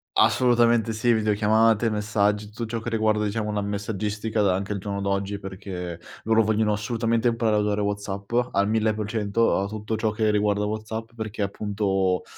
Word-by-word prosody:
Assolutamente 120 -2 +3
sì, 120 +2 +1
videochiamate, 110 +1 +3
messaggi, 105 0 0
tutto 110 +3 -6
ciò 115 +1 -3
che 120 - -4
riguarda 110 -1 +1
diciamo 105 +1 -2
una 105 -1 -1
messaggistica 105 +1 -2
da 95 -2 +3
anche 100 +2 -3
al 100 - -3
giorno 100 0 -4
d'oggi, 100 +1 -1
perché 95 -3 -7 0.2
loro 115 0 +4
vogliono 110 0 +1
assolutamente 115 +2 0
imparare 115 -2 +1
a - - +3
usare 105 0 0
WhatsApp 100 0 -4 0.2
al 100 +1 +2
1000%, 110 0 +1
a 100 - -1
tutto 105 +1 -4
ciò 110 0 0
che 110 0 +1
riguarda 105 0 +1
WhatsApp, 110 +2 -4
perché 110 -2 -4
appunto, 100 -2 0
105 Hz, 165 wpm, -25 LUFS, 100-110 Hz, 0.2 s, loro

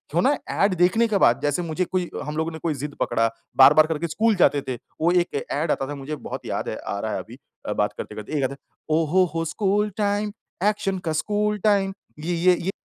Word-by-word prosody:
वो 175 - +4
ना 285 +5 +3
ऐड 200 -1 +2
देखने 225 +7 +4
के - - +4
बाद 120 -3 +4
जैसे 145 +3 0
मुझे 170 +2 -1
कोई 180 -1 -2 0.2
हम 150 0 -4
लोगों 160 +1 -1
ने 160 - -7
कोई 165 -3 +1
ज़िद 145 +1 -5
पकड़ा 115 -1 +2 0.3
बार-बार 150 +4 +8
करके 160 +1 -2
स्कूल 220 +6 +2
जाते 145 -5 +3
थे, 130 - -2 0.3
वो 170 - +4
एक 175 -5 +1
ऐड 150 +2 0
आता 135 - -1
था 145 - -5
मुझे 140 +2 -5
बहुत - - -7
याद - - -3
है - - -3
आ 100 - -4
रहा 110 0 -3
है - - -2
अभी - - -10 0.4
बात - - +1
करते-करते 105 +7 -7
एक 135 - 0
आता 130 - 0
है - - -11 0.4
ओह 160 -2 0
हो 185 +1 +5
हो 165 0 -1
स्कूल 205 +4 +1
टाइम, 205 0 0 0.3
एक्शन 205 -2 +1
का - - +1
स्कूल 210 +5 0
टाइम 200 -2 +3 0.3
ये 170 +3 -2
ये 180 +2 +4
ये 190 +3 -2
170 Hz, 235 wpm, -24 LUFS, 150-200 Hz, 0.4 s, बार-बार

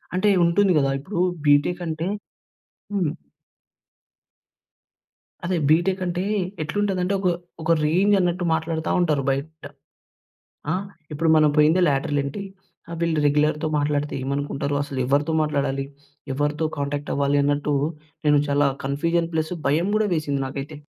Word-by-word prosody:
అంటే 185 +3 +3 0.2
ఉంటుంది 190 +3 +3
గదా 135 -2 +2
ఇప్పుడు 175 +6 -5 0.3
బీటెక్ 145 +5 +3
అంటే 160 +1 -3 0.9
హ్మ్. 180 -7 0 2.3
అదే 180 0 0
బీటెక్ 185 +4 +2
అంటే 175 0 -2 0.4
ఎట్లుంటదంటే 185 +3 -1
ఒక 190 - 0 0.3
ఒక 160 +1 0
రేంజ్ 185 +7 +3
అన్నట్టు 180 0 0
మాట్లాడతా 160 0 -2
ఉంటారు 155 -5 +1
బయట. 145 +3 -3 1.1
ఆ! - - +2 0.4
ఇప్పుడు 160 +2 0
మనం 155 -1 +5
పోయిందే 155 +4 +5
లేటరల్ 145 +1 0
ఎంటీ. 140 +9 -5 0.5
ఆ - - -8
వీళ్ళు 165 -2 +1
రెగ్యులర్‌తో 150 +1 +1
మాట్లాడితే 145 0 -1
ఏమనుకుంటారో. 140 +1 -2
అసలు 140 -2 -5
ఎవరితో 145 +4 +1
మాట్లాడాలి? 140 -2 -1 0.5
ఎవరితో 150 +3 -1
కాంటాక్ట్ 145 +1 -3
అవ్వాలి 140 0 +2
అన్నట్టు 145 +1 0 0.5
నేను 150 -1 +5
చాలా 145 0 +3 0.2
కన్ఫ్యూజన్ 165 +5 0
ప్లస్ 160 +2 -1
భయం 160 +7 +1
కూడా 215 -1 +1
వేసింది 145 -4 -1
నాకైతే. 140 +3 -6
150 Hz, 125 wpm, -23 LUFS, 145-170 Hz, 2.3 s, మనం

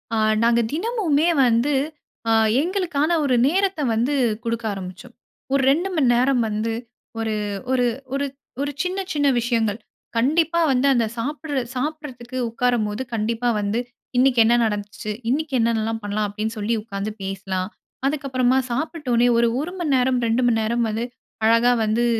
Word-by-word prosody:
ஆ - - +1 0.3
நாங்க 235 0 +4
தினமுமே 345 -5 +1 0.2
வந்து 240 +5 +2 0.6
அ - - +3 0.3
எங்களுக்கான 340 -3 0
ஒரு 260 -3 +2
நேரத்த 380 0 +1
வந்து 245 +6 +1 0.3
கொடுக்க 230 0 -2
ஆரம்பிச்சோம். 185 +4 -9 0.4
ஒரு 275 - +3
2:00 345 +7 0
மணி 270 -6 +3
நேரம் 255 0 +3
வந்து 215 +2 -1 0.5
ஒரு 220 -1 -1 0.4
ஒரு 250 -1 +3 0.3
ஒரு 280 +1 0 0.4
ஒரு 285 0 -1
சின்ன 370 +2 -2
சின்ன 290 -1 +2
விஷயங்கள். 230 -2 0 0.4
கண்டிப்பா 320 +7 +2
வந்து 260 +2 +2
அந்த 235 -2 +2
சாப்பிடு 290 +3 -2 0.2
சாப்பிட்றதுக்கு 260 -3 -5
உட்காரும்போது 230 -2 0
கண்டிப்பா 230 +2 0
வந்து 205 +3 -1 0.4
இன்னக்கி 255 -1 +4
என்ன 235 - +4
நடந்துச்சு. 210 0 -4 0.2
'இன்னக்கி 295 +2 -1
என்னன்னலாம் 225 -1 0
பண்லாம்." 205 +1 -1
அப்பிடின்னு 215 +2 -4
சொல்லி 220 +3 0
உட்காந்து 200 -1 -4
பேசலாம். 190 -1 -3 0.4
அதுக்கு 285 0 -2
அப்பறமா 255 0 +2
சாப்பிட்ட 305 +3 -3
வுனே 235 +1 +4
ஒரு, 235 - +4
1 320 +5 -3
மணி 305 -5 0
நேரம், 255 0 +2
2:00 230 +3 +2
மணி 225 -2 +2
நேரம் 235 +2 0
வந்து 220 +2 -2 0.4
அழகாக 230 +2 +4
வந்து 220 +3 +1
245 Hz, 150 wpm, -22 LUFS, 225-285 Hz, 0.6 s, நாங்க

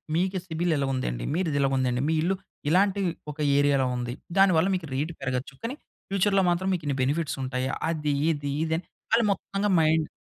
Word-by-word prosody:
మీకు 185 +3 +1
సిబిల్ 170 0 0
ఇలా 140 -1 0
ఉందండి. - - -2
మీది 165 -5 0
ఇలాగుందండి. 130 -2 +1
మీ 160 - +2
ఇల్లు 180 +4 +1 0.4
ఇలాంటి 195 +3 +3 0.3
ఒక 150 - -23 0.2
ఏరియాలో 140 -2 +3
ఉంది. 120 0 -3 0.3
దానివల్ల 185 -3 +5
మీకు 175 -3 -4
రేట్ 150 +5 -1
పెరగొచ్చు. 130 0 -3
కానీ 240 +4 -3 0.3
ఫ్యూచర్‌లో 195 0 +3
మాత్రం 175 +2 0
మీకు 175 -3 -2
ఇన్ని 140 -2 0
బెనిఫిట్స్ 145 +3 -1
ఉంటాయి. 130 0 -2 0.2
అది 150 -3 -1 0.2
ఇది 145 -2 -3
ఇది 160 0 -1
అని 175 - -6 0.3
వాళ్ళు 230 - +4
మొత్తంగా 200 +1 -1
మైండ్ 155 0 +3
160 Hz, 175 wpm, -26 LUFS, 135-185 Hz, 0.4 s, దానివల్ల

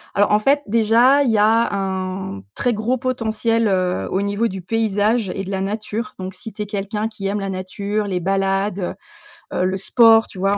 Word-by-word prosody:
alors, 205 +1 +3
en 210 - +5
fait, 280 +6 +2
déjà, 230 +6 +4
il 245 - +1
y 220 - +2
a 220 +2 +3
un 190 - -3
très 245 - 0
gros 225 +4 0
potentiel, 230 -3 0
heu, 185 -1 0
au 190 - 0
niveau 205 +3 0
du 190 0 -6
paysage 215 +2 0
et 195 -1 -4
de - - -7
la 190 -1 -2
nature, 215 +4 -4
donc 185 0 -5
si 225 +5 -9
tu 210 0 -5
es - - -6
quelqu'un 205 +1 -3
qui 215 -3 -8
aime 205 +1 -1
la 195 -1 -3
nature, 200 +3 -3
les 190 -3 -2
balades, 195 +2 0
heu, 180 - -3 0.6
heu, - - +2
le 190 +1 0
sport, 225 +2 +5
tu 190 - -11
vois? 195 +2 +1
205 Hz, 210 wpm, -20 LUFS, 195-225 Hz, 0.6 s, en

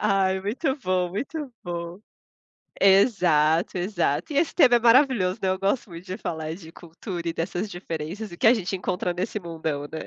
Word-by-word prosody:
Ai, 195 -2 +2
muito 260 - -1
bom, 185 -6 0
muito 275 - -5
bom. 170 +1 -6 0.8
Exato, 180 -5 +4
exato. 205 - -1
E 280 - 0
esse 320 - +1
tema 260 -8 +6
é - - +4
maravilhoso, 235 -6 +4
né. 190 - +1
Eu 185 0 -1
gosto 200 +3 0
muito 170 +1 -10
de 185 0 -5
falar 160 -6 -4
de 165 -3 -12
cultura 170 +1 -7
e - - -3
dessas 175 +5 -3
diferenças, 175 +3 -6
o 175 - -10
que - - +3
a 235 - +8
gente 195 -4 -2
encontra 180 -1 -2
nesse 190 +4 -3
mundão, 160 -5 -4
né. 160 +2 -7
185 Hz, 185 wpm, -25 LUFS, 170-215 Hz, 0.8 s, a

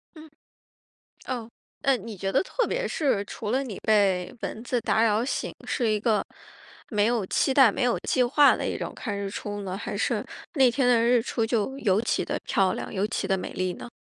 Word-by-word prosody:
嗯， 310 -1 -13 1.0
哦， 235 -3 -4 0.3
呃， 270 -2 +3
你 215 -1 -8
觉 195 +1 -3
得 - - +3
特 - - -1
别 - - -1
是 265 -10 0
除 210 0 -6
了 265 +4 +1
你 225 -8 -6
被 195 -3 +2
蚊 225 - -5
子 245 -1 0
打 220 - +2
扰 220 +1 +2
醒， 275 - -3
是 240 -4 0
一 215 -1 +2
个 220 -1 +1 0.7
没 210 -1 +2
有 230 -4 +1
期 265 - +1
待 260 -6 +7
没 260 - -3
有 245 -1 +2
计 255 - +1
划 285 +3 +5
的 - - -3
一 - - -2
种 - - -4
看 205 -4 -4
日 200 -1 -3
出 205 0 -5
呢？ 190 -1 -4
还 205 - -5
是 - - 0 0.3
那 265 -5 +5
天 255 +1 +1
的 240 -2 +5
日 240 0 +4
出 230 -1 -1
就 230 +3 -1
尤 200 -4 +2
其 235 - 0
地 - - -2
漂 190 -1 +2
亮， - - -5
尤 200 +1 0
其 215 -3 -3
地 195 -1 +1
美 - - -6
丽 185 0 -1
呢？ - - -9
225 Hz, 235 characters per minute, -26 LUFS, 205-250 Hz, 1.0 s, 待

